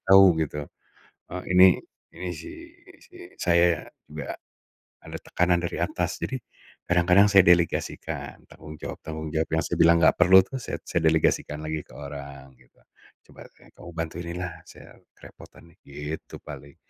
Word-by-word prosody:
tahu 95 -4 +6
gitu, 75 -1 -3 0.7
eee, 90 - -5
ini 90 +1 +8 0.5
ini 90 -1 -5
si 85 -2 -8 0.4
ini - - -17
si 360 - -18 0.3
saya, 85 -1 +3 0.2
enggak 75 -3 -7 0.7
ada - - -7
tekanan 90 0 +1
dari 85 - -3
atas. - - -2
Jadi, 130 - -3 0.5
kadang-kadang 90 +3 +5
saya 95 -2 +6
delegasikan, 85 -1 0
tanggung 75 0 -12
jawab-tanggung 80 0 -7
jawab 80 0 -1
yang 80 - +1
saya - - -3
bilang 85 0 +6
nggak 80 - +6
perlu 95 +1 +8
tuh 135 - -7
saya - - -5
saya 85 - -1
delegasikan 75 -1 +1
lagi 80 0 -3
ke - - -19
orang, 70 -2 -9
gitu. - - -27 0.5
"Coba - - -16 0.4
kamu 85 - -11
bantuin 80 +1 -5
ini 85 - -5
lah, 90 -2 -5
saya - - -15 0.2
kerepotan 85 0 -16
nih." - - -30
Gitu, 75 +2 -8
paling. 70 0 -11
85 Hz, 155 wpm, -25 LUFS, 75-90 Hz, 0.7 s, ini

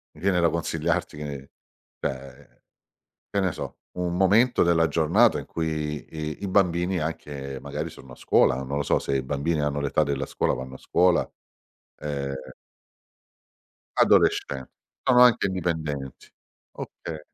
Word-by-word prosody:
Mi 75 - -15
viene 95 -1 +2
da 85 -1 +4
consigliarti 80 -1 -1
che 70 -2 -6 0.5
cioè, 65 +1 -7 0.7
che 100 - +1
ne 95 -3 +1
so, - - -7 0.2
un 90 -1 -1
momento 105 +7 +4
della 85 -1 +3
giornata, 90 +9 +3
in - - -7
cui 75 -2 -3
i 75 +1 -5
i 100 - -2
bambini, 90 -1 +2
anche, 70 -4 -5
magari - - -4
sono 65 - -13
a - - -10
scuola, 60 - +3
non 70 +2 -4
lo - - +1
so - - +2
se 70 - -1
i 65 - 0
bambini 75 +4 -1
hanno 75 0 -1
l'età 70 +2 +1
della 70 -1 -1
scuola, - - 0
vanno 65 0 -7
a - - -10
scuola. 90 -1 +2 0.7
Ehm 70 -2 -3 1.7
Adolescenti, 65 -2 +3 0.3
sono 125 -1 +5
anche 125 -4 +6
indipendenti. 80 -7 -3 0.4
Okay. 80 -2 -7
80 Hz, 145 wpm, -25 LUFS, 70-90 Hz, 1.7 s, anche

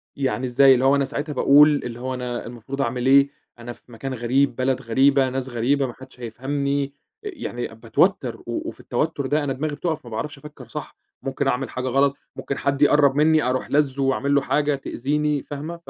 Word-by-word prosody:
يعني 130 -2 -1
إزاي؟ 135 +2 +6
اللي 130 +1 +1
هو 140 +1 +5
أنا 140 -1 +1
ساعتها 145 +2 -4
باقول 145 +3 +6
اللي 120 -1 -6
هو 130 +1 -3
أنا 125 -1 -4
المفروض 120 +4 -6
أعمل 125 0 -2
إيه؟ 140 +1 +6 0.3
أنا 120 +1 -7
في 120 - -22
مكان 130 +4 -5
غريب 125 +2 +1
بلد 130 0 0
غريبة 135 +3 +3
ناس 130 0 -4
غريبة 130 +3 +1
ما 120 - -7
حدش 130 -1 -15
هيفهمني، 140 +4 -2 0.3
يعني 330 - -5
باتوتّر، 115 0 0
و - - -4
وفي - - -12
التوتّر 155 -3 -2
ده 145 +2 +1
أنا 135 -2 -1
دماغي 150 +2 -3
بتقف 160 -2 -3
ما 120 - -10
باعرفش 140 +7 -4
أفكّر 140 -4 -12
صح - - -7 0.3
ممكن 135 +1 -2
أعمل 135 0 0
حاجة 130 0 -4
غلط 135 +2 +2 0.2
ممكن 140 - -4
حد 140 0 -1
يقرب 145 -2 +5
مِنّي 155 +1 +4
أروح 125 +1 -1
لازُّه 140 -2 +1
وأعملّه 140 +1 +2
حاجة 145 +1 +1
تأذيني، 145 +2 -1
فاهمة 150 +4 -6
ف 170 - -14
135 Hz, 195 wpm, -23 LUFS, 125-145 Hz, 0.3 s, إزاي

